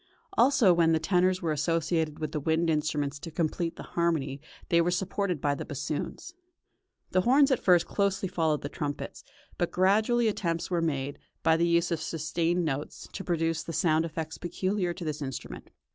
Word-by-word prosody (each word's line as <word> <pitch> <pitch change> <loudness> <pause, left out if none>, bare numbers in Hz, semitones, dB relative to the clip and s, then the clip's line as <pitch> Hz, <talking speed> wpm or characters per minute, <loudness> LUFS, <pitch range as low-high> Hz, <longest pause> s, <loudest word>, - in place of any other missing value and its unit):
Also 240 - +5
when 165 -1 +4
the 160 - +3
tenors 185 +2 +2
were 165 - +1
associated 160 0 0
with 155 -1 -4
the 155 - -2
wind 160 +3 +1
instruments 150 -2 -1
to 165 - -7
complete 165 +1 -1
the - - -8
harmony 150 -5 0 0.3
they 170 0 +5
were 170 - +1
supported 185 -1 -1
by 145 +1 +1
the 140 - -4
bassoons. 145 - -5 0.8
The 185 - +3
horns 275 +6 +5
at 260 - +3
first 175 -2 +5
closely 200 -1 0
followed 160 -4 0
the - - -2
trumpets, 145 -1 -5 0.4
but 175 - +1
gradually 215 +6 +3
attempts 170 -5 -1
were 175 -1 +1
made, 140 -3 -2 0.2
by 160 0 +5
the 170 +1 +2
use 170 +1 +2
of 165 -2 -1
sustained 165 +3 -1
notes, 145 -1 -4
to 195 - -5
produce 165 -2 0
the 165 - -6
sound 160 0 +2
effects 160 -1 -5
peculiar 180 +1 -1
to 170 0 -6
this 150 -1 -3
instrument. 110 - -6
165 Hz, 180 wpm, -28 LUFS, 155-180 Hz, 0.8 s, Also